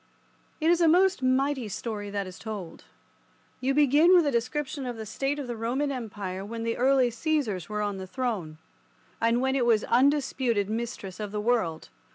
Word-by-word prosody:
It 320 +1 +3
is 345 0 +3
a 335 - +5
most 365 0 +4
mighty 260 -1 +1
story 210 0 -5
that 200 -1 -2
is 185 -1 -10
told. 210 -6 -7 0.7
You 270 +1 0
begin 300 +5 +5
with 345 -3 +5
a 285 - +1
description 265 +3 -2
of 240 -2 -5
the 220 - -6
state 270 +7 -2
of 285 - -4
the 240 -1 -4
Roman 250 +6 -1
Empire 205 -7 -5
when 225 +3 -5
the 230 0 -1
early 260 -1 +3
Caesars 230 - -1
were 210 0 -2
on 205 -1 -2
the 190 0 -7
throne, 195 -9 -3 0.6
and 230 +2 +2
when 265 +1 +1
it 265 - +2
was 220 -2 +4
undisputed 250 -5 +2
mistress 220 -5 -5
of 210 -2 -4
the 210 - -3
world. 210 -8 0
235 Hz, 190 wpm, -27 LUFS, 210-275 Hz, 0.7 s, a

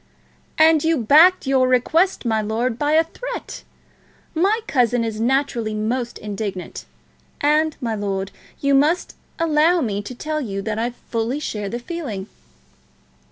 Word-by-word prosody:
"And 315 -1 +5
you 325 0 +2
backed 310 - +5
your 265 -1 +3
request, 310 +8 +2
my 220 -2 +1
lord, 225 +3 -2
by 295 +1 +1
a 320 +1 +5
threat! - - -7 0.7
My 395 +7 +2
cousin 245 - +1
is 220 -1 -3
naturally 240 -3 0
most 235 +3 -2
indignant; 200 -3 -5 0.5
and, 305 +1 +2
my 235 -5 -2
lord, 195 -2 -3 0.3
you 280 0 +2
must 300 +6 +2 0.2
allow 330 +2 +3
me 210 -8 -1
to 225 +5 -8
tell 305 +4 -3
you 195 -6 -4
that 220 0 -3
I 235 +2 0
fully 240 +2 -3
share 210 -8 -4
the 235 - -3
feeling." 240 - -5
255 Hz, 145 wpm, -21 LUFS, 220-310 Hz, 0.7 s, And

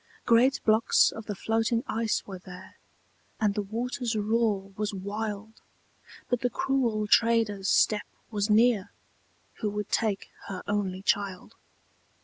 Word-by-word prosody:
Great 250 +4 +4
blocks 220 +1 +4
of 225 -1 -9
the 205 - -3
floating 225 +3 0
ice 225 -1 -1
were 190 -2 -8
there, 180 0 -12 0.6
And 210 -2 +2
the 210 - -1
water's 235 +3 -3
roar 210 -2 0
was 210 0 -2
wild, 210 +2 -5 0.7
But 245 - 0
the 245 - +1
cruel 245 -8 0
trader's 220 -3 +2
step 210 -1 +3 0.2
was 205 -1 -1
near, 215 -2 +4 0.7
Who 210 - -1
would 210 0 -4
take 215 -4 0 0.2
her 195 -2 -6
only 195 -2 -2
child. 200 -3 -1
215 Hz, 130 wpm, -28 LUFS, 200-230 Hz, 0.7 s, Great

